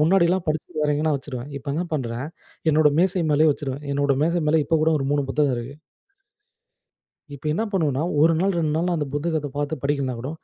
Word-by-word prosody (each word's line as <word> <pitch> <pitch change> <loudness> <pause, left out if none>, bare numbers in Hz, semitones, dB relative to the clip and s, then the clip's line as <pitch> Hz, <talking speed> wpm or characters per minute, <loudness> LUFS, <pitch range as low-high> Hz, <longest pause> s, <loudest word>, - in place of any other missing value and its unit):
முன்னாடிலாம் 175 +2 +3
படிச்சிட்டு, 155 +1 -3
வேறெங்கன்னா 150 +1 +1
வச்சுருவேன். 135 -1 -7
இப்ப 140 - -9
என்ன 170 - 0
பண்றேன், 125 -3 -2 0.4
என்னோட 155 0 +5
மேசை 180 0 +2
மேலேயே 150 +1 +4
வச்சுருவேன். 140 -1 -5
என்னோட 140 0 +2
மேசை 170 +2 +1
மேல 160 0 +4
இப்பக்கூட, 160 0 +2
ஒரு 135 - -2
3 145 -1 +2
புத்தகம் 145 -2 +2
இருக்கு. 120 +4 -7 1.6
இப்ப 140 - -15
என்ன 215 - 0
பண்ணுவோண்னா, 155 -7 0 0.2
1 165 +2 +5
நாள், 195 +2 +1
2 155 -2 0
நாள்ல 175 +2 +1
அந்த 150 - -1
புத்தகத்தப் 150 -2 -2
பார்த்து 145 +2 -2
படிக்கலனாகூட, 135 -3 -1
150 Hz, 175 wpm, -23 LUFS, 140-165 Hz, 1.6 s, என்னோட